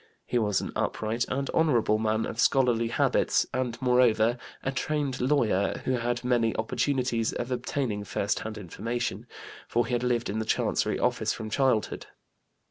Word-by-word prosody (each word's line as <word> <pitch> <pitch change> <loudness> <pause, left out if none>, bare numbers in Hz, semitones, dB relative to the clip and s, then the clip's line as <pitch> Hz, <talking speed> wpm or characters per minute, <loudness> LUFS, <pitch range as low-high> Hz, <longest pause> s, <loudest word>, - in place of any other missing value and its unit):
He 120 - 0
was 105 -3 +1
an - - -5
upright 110 +2 -1
and 135 +1 -1
honorable 120 -9 +3
man 110 0 0
of 115 - -6
scholarly 125 -4 +3
habits, 115 - +2
and, 125 -2 -2
moreover, 125 -2 +3 0.2
a 135 - 0
trained 140 -2 -2
lawyer, 120 -8 +1
who - - +1
had 120 0 -1
many 120 -3 +1
opportunities 120 0 0
of 120 +1 -4
obtaining 125 -4 -2
first 100 0 -1
hand 110 0 -6
information, 115 +5 -4 0.4
for 120 0 +1
he 125 - -4
had 120 - +1
lived 125 -1 0
in 105 +2 -2
the 110 - -2
Chancery - - 0
office - - 0
from 110 -1 -6
childhood. 130 -4 +1
120 Hz, 160 wpm, -27 LUFS, 110-125 Hz, 0.4 s, honorable